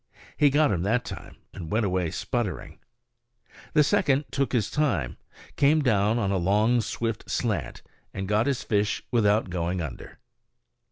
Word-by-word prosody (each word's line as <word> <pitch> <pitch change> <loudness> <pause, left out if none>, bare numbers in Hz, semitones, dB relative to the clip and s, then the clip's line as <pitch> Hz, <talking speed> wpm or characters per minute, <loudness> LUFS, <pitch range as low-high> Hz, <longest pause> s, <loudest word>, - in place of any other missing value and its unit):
He 145 - +4
got 145 -2 +3
him 90 -4 0
that 115 +6 0
time - - -8 0.2
and 85 -4 -8
went 110 +1 +1
away 90 -3 0
sputtering. - - -4 0.9
The 150 - +5
second 140 -1 +2
took 140 -1 -1
his 110 -5 0
time, 125 - 0 0.4
came 150 +2 +4
down 110 -2 +2
on 100 -5 0
a 100 - +1
long 105 +7 +2
swift 115 0 -4
slant, 100 - -2 0.3
and 95 -1 -5
got 105 +4 +2
his 140 -3 -1
fish 105 -1 0
without 105 -4 +2
going 90 +1 -2
under. 75 -7 -7
110 Hz, 155 wpm, -26 LUFS, 95-125 Hz, 0.9 s, The